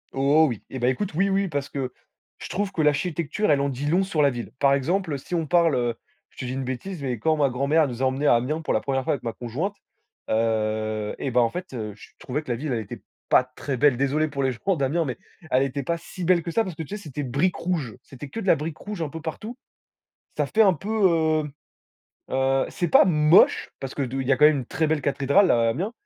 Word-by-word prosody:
Oh, 140 +4 +4
oui. 115 -5 -5
Eh 130 - -6
ben, 120 - +1
écoute, 170 +9 -2
oui, 195 +4 +2
oui, 195 0 +1
parce 145 -4 -3
que 130 -3 -4 0.5
je - - -8
trouve 200 +1 -2
que 175 - -1
l'architecture, 155 +6 0
elle 140 -1 +3
en 140 - 0
dit 135 +1 -4
long 175 +6 +2
sur 170 -5 0
la 140 - +5
ville. 120 -3 -6
Par 140 -1 +4
exemple, 160 +3 0
si 155 +6 -5
on 165 -2 0
parle, 170 -1 +3
heu, 120 -2 0 0.4
je - - -29
te - - -5
dis 125 - -4
une 135 0 -3
bêtise, 145 +7 -5
mais 130 -3 -2
quand 155 +6 +1
ma 145 -2 +3
grand-mère 140 +5 +2
nous 125 -1 -6
a - - +4
emmenés 135 +3 0
à - - +6
Amiens 140 +7 -1
pour - - -1
la 110 - +1
1re 135 0 -1
fois - - 0
avec 140 - -5
ma 115 - -2
conjointe, 145 - -4 0.5
heu 110 -1 0
et 135 - -3
ben, 125 - +3
en 115 - +3
fait, 180 0 -7
heu, 110 -4 -5
je 105 - -15
trouvais 140 +4 -3
que 130 - -5
la 120 - -1
ville, 140 +1 -3
elle 115 - -1
était 100 - -9 0.3
pas - - +5
très 130 +1 -5
belle. 145 0 +4
Désolé 140 +4 +1
pour 140 -2 -3
les 130 - +2
gens 180 - -1
d'Amiens, 155 +3 0
mais 125 -5 -4 0.3
elle 130 +1 +3
était 135 +1 -3
pas 170 +5 -1
si 175 +1 -7
belle 175 -1 +3
que 170 - -4
ça, 225 - +2
parce 180 - -6
que, 160 - -5
tu - - -13
sais, - - -11
c'était 145 -1 -5
briques 140 +8 0
rouges, 165 -10 -3
c'était 135 +1 -10
que 225 - -6
de 195 - -6
la - - +6
brique 150 +2 -5
rouge 205 -4 -6
un 160 - -2
peu 160 +2 -8
partout. 215 +10 -6 0.8
Ça - - +1
fait 220 - +3
un 195 -4 +5
peu, 195 +7 -7 0.6
heu - - -12 0.8
heu, 135 0 +1
c'est 175 - -2
pas - - +7
moche, 155 0 +4
parce 135 -1 -6
que 145 - -2
de 135 +1 -3
il 130 - -4
y 135 - +3
a - - +4
quand 150 - +4
même 150 -2 +4
une 125 - -5
très 165 0 0
belle 155 -1 0
cathédrale 140 +7 +3
à 115 -1 +3
Amiens, 180 - -3
145 Hz, 265 wpm, -24 LUFS, 130-170 Hz, 0.8 s, pas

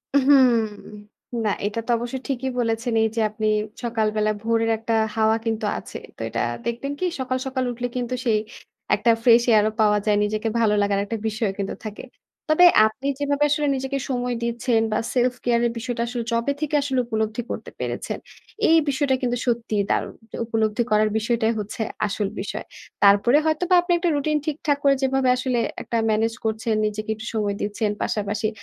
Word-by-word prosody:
হুম। 275 -2 +6 0.9
না, 215 - +1 0.2
এইটা 205 +2 -2
তো - - -14
অবশ্য 240 +2 -5
ঠিকই 265 -1 -2
বলেছেন 230 0 -1
এই 225 - +3
যে 230 - +1
আপনি 215 0 -2 0.4
সকালবেলা 215 -2 0
ভোরের 225 0 +1
একটা 225 +1 -3 0.2
হাওয়া 220 0 +3
কিন্তু 225 0 -1
আছে। - - -8 0.2
তো - - -22
এইটা - - -2 0.2
দেখবেন 235 +4 -3
কি 370 - 0
সকাল, 255 0 -1
সকাল 260 -1 -1
উঠলে 245 +1 -3
কিন্তু 245 0 -2
সেই 220 -3 +3 0.6
একটা 235 - +3
fresh 235 -1 +6
air 210 - +5
ও - - -7
পাওয়া 210 -1 +4
যায়। 210 -1 +3
নিজেকে 215 +2 -1
ভালো 215 -2 +3
লাগার 200 -1 +1
একটা 225 +3 -3
বিষয়ও 220 -2 -1
কিন্তু 195 - -2
থাকে। 210 -1 -6 0.5
তবে 355 +3 +7 0.2
আপনি 260 +5 -6
যেভাবে 285 0 +1
আসলে 295 0 +1
নিজেকে 265 +1 -2
সময় 245 -1 -1
দিচ্ছেন 235 0 +1
বা 215 - +1
self 250 0 +2
care 235 -1 +3
এর - - -2
বিষয়টা 230 0 -3
আসলে 240 -1 -3
যবে 230 +4 +1
থেকে 300 0 -1
আসলে 270 -2 0
উপলব্ধি 220 0 -2
করতে - - -5
পেরেছেন, - - -3 0.5
এই 325 - +6
বিষয়টা 280 -1 +1
কিন্তু 245 -1 0
সত্যিই 230 -4 0
দারুণ। - - -1 0.2
তো - - -7
উপলব্ধি 220 0 0
করার 215 0 +4
বিষয়টাই 225 0 +1
হচ্ছে 210 +2 -5 0.3
আসল 205 0 -2
বিষয়। 200 - -5 0.4
তারপরে 205 +7 +6
হয়তোবা 335 +4 +2
আপনি 350 - -3
একটা 345 0 0
routine 300 +1 +1
ঠিকঠাক 300 -1 0
করে 280 -1 +5
যেভাবে 265 -1 +2
আসলে 255 -1 0 0.2
একটা 235 - -2
manage 225 +2 +1
করছেন, 220 0 -1
নিজেকে 215 +1 -3
একটু 220 +1 -9
সময় 210 -2 -1
দিচ্ছেন। 205 +1 -1
পাশাপাশি 210 +1 -1
230 Hz, 180 wpm, -23 LUFS, 215-260 Hz, 0.9 s, তবে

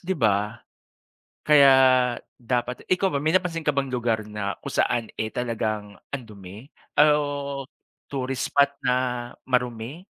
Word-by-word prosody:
di 185 +1 -3
ba? 105 -3 +1 0.9
Kaya 140 -2 +7 0.6
dapat 125 +1 -3
ikaw 185 -2 +2
ba 140 - 0
may 155 - +2
napansin 175 -3 -2
ka 150 - +2
bang 140 -1 -1
lugar 115 -3 -1
na 105 -1 -4
kung - - -7
saan, 115 -2 +1
eh, 110 - -3
talagang 110 -4 -3 0.2
ang 135 -3 -5
dumi 100 +2 -11 0.3
o 145 -2 +2 0.5
tourist 135 -2 -3
spot 140 0 +3
na 125 -2 +2 0.5
marumi? 125 +5 -2
125 Hz, 135 wpm, -24 LUFS, 110-145 Hz, 0.9 s, Kaya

